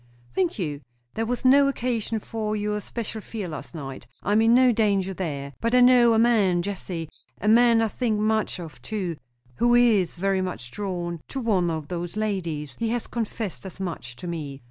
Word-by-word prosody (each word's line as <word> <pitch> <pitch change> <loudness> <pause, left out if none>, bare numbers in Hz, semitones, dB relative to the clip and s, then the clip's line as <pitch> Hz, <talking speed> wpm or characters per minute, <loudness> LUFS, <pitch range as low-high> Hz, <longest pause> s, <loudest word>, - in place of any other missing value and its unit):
"Thank 175 +6 0
you. 150 -7 -3 0.3
There 225 0 -2
was 245 +2 -2
no 275 +2 +7
occasion 235 -4 -1
for 215 0 -3
your 210 0 -1
special 220 0 -5
fear 210 -3 -5
last 155 +1 -8
night. 135 -5 -7 0.2
I 200 - -1
am 215 +2 +5
in 225 +1 +5
no 255 0 +6
danger 200 -4 +1
there. 140 -7 -4
But 230 +2 +1
I 250 - +6
know 245 -2 +6
a - - +3
man, 210 -7 +3
Jessie, 180 -4 -4 0.3
a 210 - -3
man 230 +1 +6
I - - +2
think 220 -1 -1
much 215 -1 +1
of, 155 -7 -9
too, 185 - -3 0.4
who 240 0 +4
is 225 -7 +4
very 190 +2 +1
much 175 -10 -5
drawn 175 -4 -4
to 270 - -4
one 200 -8 +1
of 160 -3 -3
those 175 +3 -4
ladies. 170 -9 -2
He 230 -1 0
has 235 0 -1
confessed 225 -4 -4
as 190 -1 -9
much 165 -10 -5
to 125 - -10
me. 150 -5 -5
205 Hz, 195 wpm, -25 LUFS, 170-225 Hz, 0.4 s, no